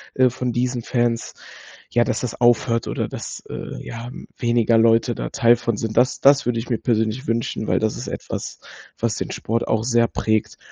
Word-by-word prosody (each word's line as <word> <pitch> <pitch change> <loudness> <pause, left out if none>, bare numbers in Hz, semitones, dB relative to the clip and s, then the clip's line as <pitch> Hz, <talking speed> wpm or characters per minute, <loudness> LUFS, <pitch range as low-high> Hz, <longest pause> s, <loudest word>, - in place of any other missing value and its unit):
äh, 130 -1 +5
von 125 0 -3
diesen 125 0 -1
Fans, 120 0 -1 0.6
ja, 120 0 +4
dass - - -2
das 125 0 -5
aufhört 120 -1 +3
oder - - -2
dass, - - -7
äh, - - -7
ja, 115 +1 -7
hm, 125 - -9
weniger 120 -1 +3
Leute 115 +1 +4
da - - -4
Teil 120 0 +4
von 115 -2 -2
sind. 110 0 -3
Das 125 0 +3
das 140 -2 +5
würde 120 -1 +1
ich 115 - -6
mir 115 - +1
persönlich 115 +3 0
wünschen, 115 -1 -1
weil - - +2
das 110 -1 0
ist - - -6
etwas, - - -5 0.4
was 115 -1 0
den - - -3
Sport 115 +1 -2
auch 110 0 +1
sehr 120 -1 +3
prägt 110 -2 -1
115 Hz, 200 wpm, -22 LUFS, 115-120 Hz, 0.6 s, äh